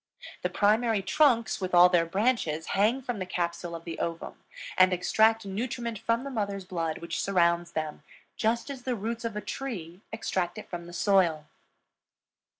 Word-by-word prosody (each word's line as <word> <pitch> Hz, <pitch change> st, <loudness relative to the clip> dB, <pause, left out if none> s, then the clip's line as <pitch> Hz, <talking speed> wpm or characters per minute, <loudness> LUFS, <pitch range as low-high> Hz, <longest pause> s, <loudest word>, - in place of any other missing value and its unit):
The -, -, 0 dB
primary 215 Hz, 0 st, +2 dB
trunks 235 Hz, 0 st, +2 dB
with 185 Hz, -1 st, -1 dB
all 175 Hz, +1 st, +9 dB
their 175 Hz, -2 st, +2 dB
branches 190 Hz, -5 st, 0 dB
hang 225 Hz, +7 st, +2 dB
from 245 Hz, -4 st, -3 dB
the 185 Hz, -, -3 dB
capsule 170 Hz, -1 st, -3 dB
of 165 Hz, -, -8 dB
the 165 Hz, -2 st, -6 dB
ovum 165 Hz, 0 st, -5 dB, 0.3 s
and 185 Hz, 0 st, +6 dB
extract 220 Hz, +5 st, +3 dB
nutriment 230 Hz, +2 st, -3 dB
from 230 Hz, +2 st, 0 dB
the 275 Hz, -, -6 dB
mother's 200 Hz, -5 st, -3 dB
blood 165 Hz, -3 st, -2 dB
which 170 Hz, +1 st, -4 dB
surrounds 170 Hz, -2 st, +2 dB
them, 155 Hz, -1 st, -3 dB, 0.3 s
just 235 Hz, +5 st, 0 dB
as 265 Hz, -2 st, -7 dB
the 250 Hz, 0 st, -2 dB
roots 230 Hz, +2 st, -4 dB
of 230 Hz, -, -3 dB
a 210 Hz, -, -3 dB
tree 190 Hz, -11 st, -6 dB
extract 175 Hz, -2 st, -2 dB
it -, -, -8 dB
from 175 Hz, -1 st, -7 dB
the -, -, -10 dB
soil. 175 Hz, -6 st, +2 dB
195 Hz, 170 wpm, -28 LUFS, 170-230 Hz, 0.3 s, all